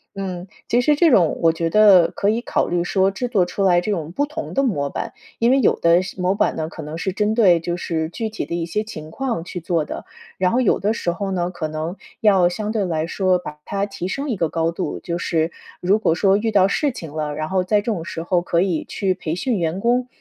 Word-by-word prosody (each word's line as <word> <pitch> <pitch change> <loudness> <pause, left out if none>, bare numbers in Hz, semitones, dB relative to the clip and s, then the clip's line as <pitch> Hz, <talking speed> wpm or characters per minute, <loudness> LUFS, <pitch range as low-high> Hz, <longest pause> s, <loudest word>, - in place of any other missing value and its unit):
嗯， 185 -2 -5 0.2
其 240 +1 +3
实 295 +4 +3
这 325 +1 +4
种 175 -9 +3
我 165 - +5
觉 165 0 -1
得 195 -3 +6
可 200 - 0
以 225 +2 +1
考 - - 0
虑 175 0 0
说， 190 +2 +2
制 245 +6 -3
作 200 -7 +3
出 195 +2 -3
来 180 -2 +5
这 195 +4 -2
种 165 -5 -3
不 285 +11 0
同 305 +2 -6
的 275 - +2
模 145 - 0
板。 - - -5 0.2
因 235 +2 +3
为 270 - +4
有 - - +3
的 170 +1 +4
时 185 - -8
模 180 +1 +2
板 - - +1
呢， 160 -1 -2
可 160 - -9
能 150 +2 -6
是 185 +2 -2
针 210 +2 0
对 185 -7 +5
就 175 +1 -3
是 160 -2 -2
具 220 +6 -4
体 215 0 -4
的 170 - -4
一 170 - -2
些 210 +6 -2
情 155 -8 -9
况 235 -6 -2
去 180 - -6
做 165 -2 0
的。 - - -7 0.3
然 185 -1 +2
后 245 - +2
有 230 - +2
的 210 +3 +1
时 175 - -1
候 195 +2 -4
呢， 175 -1 -1
可 170 -3 -4
能 155 +3 -4 0.3
要 195 -5 +5
相 210 +4 -3
对 220 -2 0
来 160 -3 -1
说 185 0 +2
把 150 -4 -9
它 200 0 -1
提 195 -3 -5
升 280 +8 -3
一 240 - 0
个 165 -5 0
高 165 0 0
度。 175 +2 -4
就 170 -1 -4
是 165 -1 0 0.3
如 195 +4 +2
果 165 - +2
说 195 +3 +3
遇 225 +1 -1
到 195 -2 +5
事 285 +8 0
情 165 - -9
了， 150 -1 -3
然 155 +1 -3
后 185 +2 +1
在 205 +3 +2
这 205 - -7
种 210 -8 -2
时 165 -1 -5
候 175 0 +1
可 170 -1 +1
以 180 -5 0
去 190 -2 0
培 170 -3 -4
训 240 +4 -1
员 170 +2 -1
工， 245 +3 +1
185 Hz, 280 characters per minute, -21 LUFS, 170-210 Hz, 0.3 s, 得